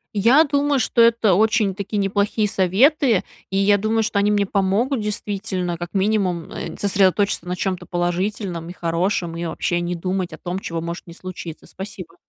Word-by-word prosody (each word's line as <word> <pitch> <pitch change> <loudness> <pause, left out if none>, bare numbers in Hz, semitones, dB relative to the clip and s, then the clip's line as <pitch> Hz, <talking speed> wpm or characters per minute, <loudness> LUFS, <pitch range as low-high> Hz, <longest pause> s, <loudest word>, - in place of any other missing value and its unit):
Я 235 +10 +6
думаю, 285 -1 +1
что 235 0 +2
это 230 -3 +4
очень-таки 205 0 +1
неплохие 205 +2 +1
советы, 220 - +3 0.3
и 195 - -1
я 200 +1 +4
думаю, 220 +2 +1
что 210 -1 0
они 205 +1 +2
мне 205 -1 +2
помогут, 205 +7 0
действительно, 200 -4 -3
как 175 +3 -7
минимум, 190 -4 0
э, - - -5
нь - - -9
сосредоточиться 195 -2 +2
на 180 - -2
чем-то 185 -1 -3
положительном 175 0 -2
и - - -7
хорошем, 170 0 -1
и 170 - -4
вообще 175 +2 -1
не 175 +1 -2
думать 185 +1 -2
о 160 - -8
том, 180 +1 -4
чего 165 -3 -4
может 170 +2 -6
не 170 - -10
случиться. 175 -3 -8
Спасибо. 190 -3 -9
195 Hz, 175 wpm, -21 LUFS, 175-215 Hz, 0.3 s, Я